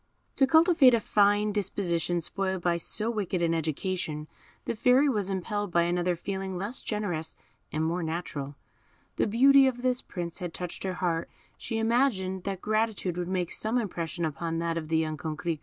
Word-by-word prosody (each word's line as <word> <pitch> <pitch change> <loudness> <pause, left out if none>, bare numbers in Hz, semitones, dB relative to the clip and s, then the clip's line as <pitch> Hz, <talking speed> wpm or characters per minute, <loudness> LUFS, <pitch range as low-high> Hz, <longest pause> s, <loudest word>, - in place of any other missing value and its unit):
To 270 - +5
cultivate 320 -4 +6
a - - +1
fine 205 0 +3
disposition 175 -4 0
spoiled 190 +1 -2
by 175 -1 +2
so 215 +6 +1
wicked 195 -5 -2
an 165 0 +2
education, 160 -1 -2 0.4
the - - -2
Fairy 255 +5 +4
was 210 -8 0
impelled 205 +1 -2
by 170 0 +3
another 175 +1 0
feeling 190 +1 -4
less 205 +7 -3
generous 180 -7 -3 0.4
and 155 +1 -1
more 170 +2 -1
natural. 160 -4 -4 0.6
The - - +2
beauty 270 +5 +6
of 245 -1 -2
this 255 0 +1
Prince 170 -2 -5
had 175 -2 -5
touched 180 -1 -5
her 185 -1 -2
heart, 170 -2 -1 0.3
she 225 - -4
imagined 225 -6 +1
that 195 -2 -3
gratitude 215 -4 0
would 175 -1 -3
make 180 -2 -1
some 220 +3 +1
impression 175 -6 -2
upon 165 +2 -3
that 165 0 -1
of 165 -2 -4
the 160 +1 +1
young 155 -1 -1
Coquerico. 160 +1 -3
185 Hz, 175 wpm, -28 LUFS, 170-215 Hz, 0.6 s, cultivate